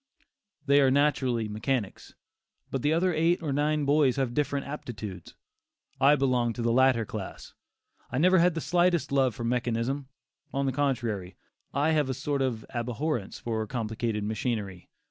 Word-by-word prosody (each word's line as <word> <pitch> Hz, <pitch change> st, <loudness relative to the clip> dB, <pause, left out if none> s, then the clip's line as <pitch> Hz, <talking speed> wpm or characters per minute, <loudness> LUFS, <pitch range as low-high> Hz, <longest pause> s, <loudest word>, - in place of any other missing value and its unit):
They 140 Hz, 0 st, +5 dB
are 135 Hz, -, +5 dB
natural 135 Hz, -2 st, +2 dB
mechanics; 110 Hz, 0 st, -3 dB, 0.6 s
but 135 Hz, -, -2 dB
the 145 Hz, -, +2 dB
other 175 Hz, +3 st, +2 dB
eight 165 Hz, +2 st, +2 dB
or 145 Hz, -3 st, -1 dB
nine 150 Hz, +1 st, +1 dB
boys 140 Hz, -2 st, +3 dB
have 130 Hz, -3 st, -1 dB
different 140 Hz, 0 st, -1 dB
aptitudes. 105 Hz, -, -7 dB, 0.6 s
I 140 Hz, +2 st, +6 dB
belong 125 Hz, -4 st, +1 dB
to 120 Hz, -, -4 dB
the 115 Hz, -, +2 dB
latter 130 Hz, -2 st, +4 dB
class; 105 Hz, -2 st, -7 dB, 0.6 s
I -, -, -2 dB
never 185 Hz, +5 st, +5 dB
had 175 Hz, 0 st, +3 dB
the 165 Hz, -, -2 dB
slightest 175 Hz, -4 st, +2 dB
love 135 Hz, -5 st, +2 dB
for 120 Hz, -, -5 dB
mechanism; 120 Hz, +3 st, -1 dB, 0.4 s
on 140 Hz, 0 st, -1 dB
the 135 Hz, -, +1 dB
contrary, 120 Hz, -9 st, -1 dB, 0.4 s
I 145 Hz, +3 st, +1 dB
have 150 Hz, -4 st, +1 dB
a 130 Hz, -, -1 dB
sort 140 Hz, +1 st, -2 dB
of 125 Hz, -4 st, -1 dB
abhorrence 120 Hz, 0 st, -2 dB
for 110 Hz, -2 st, -3 dB
complicated 110 Hz, -2 st, -2 dB
machinery. 105 Hz, -3 st, -3 dB
130 Hz, 160 wpm, -28 LUFS, 115-145 Hz, 0.6 s, I